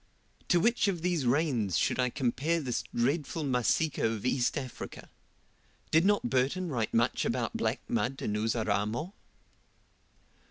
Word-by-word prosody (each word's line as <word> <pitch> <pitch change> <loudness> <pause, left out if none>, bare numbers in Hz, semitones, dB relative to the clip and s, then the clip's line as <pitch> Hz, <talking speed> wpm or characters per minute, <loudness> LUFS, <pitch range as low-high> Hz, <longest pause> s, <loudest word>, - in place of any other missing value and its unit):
To 175 - +4
which 230 +3 +2
of 175 -4 -1
these 175 -7 0
rains 120 - +1
should - - +1
I 125 0 +2
compare 140 +6 0
this 130 -6 -2
dreadful 145 +6 0
Masika 135 +3 +1
of 110 -1 -1
East 125 -1 +1
Africa? 130 -2 -7 0.8
Did 160 +3 +4
not 205 -10 +3
Burton 135 +9 0
write 115 -7 -1
much 115 +1 +1
about - - -1
black - - -1
mud 120 +4 -1
in 105 - -1
Uzaramo? 110 - -1
130 Hz, 135 wpm, -30 LUFS, 115-165 Hz, 0.8 s, To